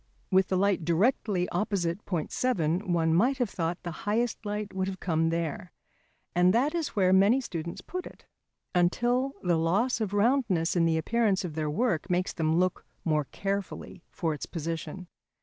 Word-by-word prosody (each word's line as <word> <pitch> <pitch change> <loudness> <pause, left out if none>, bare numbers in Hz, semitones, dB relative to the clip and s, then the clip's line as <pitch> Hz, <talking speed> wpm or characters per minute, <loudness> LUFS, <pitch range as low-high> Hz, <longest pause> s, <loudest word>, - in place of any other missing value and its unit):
With 190 0 +4
the 185 - 0
light 195 -2 +2
directly 185 +1 +1
opposite 180 -1 -1
point 170 -5 -2
7, 180 -6 0
one 165 -2 +2
might 245 +11 +3
have 245 -5 -1
thought 170 0 -2
the 175 - -4 0.2
highest 230 +2 0
light 210 -1 -4
would 190 0 -1
have 190 -1 -5
come 165 -2 +1
there, 165 +1 -3 0.6
and 180 +3 +4
that 275 +7 +2
is 335 -6 -2
where 185 -2 +4
many 200 +7 +5
students 170 -9 -5
put 365 0 -5
it, - - -15 0.5
until 240 +9 +2
the 175 -2 +2
loss 205 +10 +1
of 210 -3 -1
roundness 205 -6 +2
in 170 -1 +3
the 165 -1 +2
appearance 205 +2 +1
of 165 - -5
their 155 -1 -2
work 195 +1 0
makes 180 +1 0
them 160 0 +1
look 185 0 +1 0.2
more 155 -3 +1
carefully 195 +1 -4
for 165 -4 -2
its 150 - -6
position. 165 +2 -5
185 Hz, 175 wpm, -28 LUFS, 165-215 Hz, 0.6 s, many